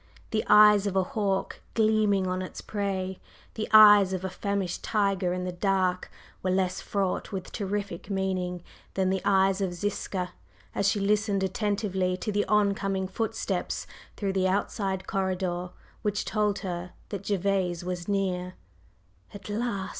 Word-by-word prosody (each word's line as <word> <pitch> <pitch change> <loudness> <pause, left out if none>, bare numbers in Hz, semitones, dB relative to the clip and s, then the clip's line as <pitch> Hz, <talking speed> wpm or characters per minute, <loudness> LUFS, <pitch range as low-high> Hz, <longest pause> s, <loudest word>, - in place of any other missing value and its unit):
The 215 - +1
eyes 210 -1 +7
of 195 - -2
a 190 - +3
hawk 195 0 -2
gleaming 215 -3 +3
on 185 0 -1
its 185 - -7
prey, 190 -2 -3 0.3
the 215 - -4
eyes 205 -3 +8
of 185 0 -3
a 190 - -3
famished 195 -2 -2
tiger 195 -4 +1
in 180 0 -2
the 180 - -2
dark, 185 0 0 0.3
were 185 - -1
less 185 0 0
fraught 195 -3 -2
with 190 -2 -5
terrific 200 -3 -4
meaning 185 -2 -2 0.3
than 190 -1 +2
the 190 -1 0
eyes 195 0 +3
of 180 -2 -1
Ziska 185 -1 -3 0.4
as 200 - +1
she 205 +1 +2
listened 205 0 +1
attentively 190 -2 0
to 210 - -3
the 205 0 +1
on 210 -1 +3
coming 195 -1 -2
footsteps 220 +4 -2 0.3
through 195 -2 -1
the 190 -1 +2
outside 195 0 -1
corridor 185 -3 -1 0.3
which 210 -2 -1
told 210 -2 0
her 175 -1 -4 0.2
that 200 -2 -5
Gervase 190 -3 0
was 180 -1 -4
near. 185 -2 -1 0.8
"At 200 0 -9
last!" 210 -3 -2
195 Hz, 155 wpm, -27 LUFS, 185-205 Hz, 0.8 s, eyes